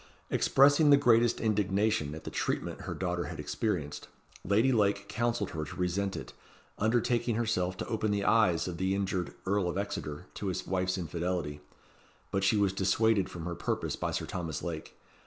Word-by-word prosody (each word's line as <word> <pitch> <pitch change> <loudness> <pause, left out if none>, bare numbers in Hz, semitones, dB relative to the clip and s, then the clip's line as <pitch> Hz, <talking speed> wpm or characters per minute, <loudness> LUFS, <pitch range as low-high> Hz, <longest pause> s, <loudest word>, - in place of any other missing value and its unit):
Expressing 145 +3 +5
the 140 - +8
greatest 120 -3 +4
indignation 100 -7 +1
at 80 - -9
the - - -6
treatment - - -2
her - - -3
daughter - - -2
had - - -7
experienced, 85 -10 -2 0.4
Lady 110 +7 +3
Lake 100 -3 +2
counselled 120 -3 -1
her 80 -2 -3
to 75 - -8
resent 95 +2 -1
it, - - -8 0.5
undertaking 120 +1 +1
herself 95 -5 0
to - - -4
open 110 -1 -1
the 100 -1 0
eyes 95 -8 +3
of 85 -2 -4
the 95 +2 0
injured 95 -3 -2
Earl 95 -1 +1
of 85 - -3
Exeter 90 -5 -4
to 100 - -5
his 95 0 -2
wife's 95 0 0
infidelity; 85 -3 -3 0.7
but 95 0 0
she 100 +3 +3
was 100 -2 +2
dissuaded 95 +1 +2
from 85 -3 -7
her 85 - -3
purpose - - -2
by - - -2
Sir - - -2
Thomas 85 -4 -4
Lake. 80 -3 -6
100 Hz, 175 wpm, -30 LUFS, 90-110 Hz, 0.7 s, the